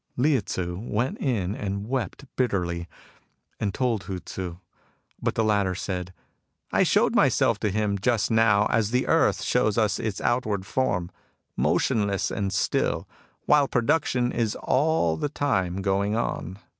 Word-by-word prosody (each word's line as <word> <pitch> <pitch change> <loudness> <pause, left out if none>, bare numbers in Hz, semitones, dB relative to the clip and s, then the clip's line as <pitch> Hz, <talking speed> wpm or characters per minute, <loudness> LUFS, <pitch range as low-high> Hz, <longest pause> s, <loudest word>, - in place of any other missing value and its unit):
Lieh 135 -1 +3
Tzu 90 -2 -4
went 120 +3 -2
in 105 -8 -1
and 100 -1 -4
wept 130 +1 -3
bitterly, 90 -8 -1 0.7
and 100 - 0
told 115 -3 -1
Hu 95 -2 -4
Tzu; 90 -1 -6 0.6
but - - -1
the 115 - +2
latter 100 -4 +1
said: 90 -1 -4 0.3
" - - -42
I - - +4
showed - - +3
myself - - +3
to 105 - 0
him 100 0 0
just 115 +1 +1
now 110 -2 +4
as 110 -2 +2
the 125 +2 +1
earth - - +2
shows 110 0 +1
us 110 -2 +2
its 110 -3 -3
outward 105 -6 0
form, 95 -7 -1 0.4
motionless 100 -3 +1
and 100 -2 -2
still, 95 - 0 0.4
while 145 -2 +4
production 125 -1 +1
is 115 -2 -1
all 135 - +2
the 145 - -2
time 95 -11 -1
going 100 +2 +1
on. 95 -5 -3
105 Hz, 150 wpm, -25 LUFS, 95-120 Hz, 0.7 s, I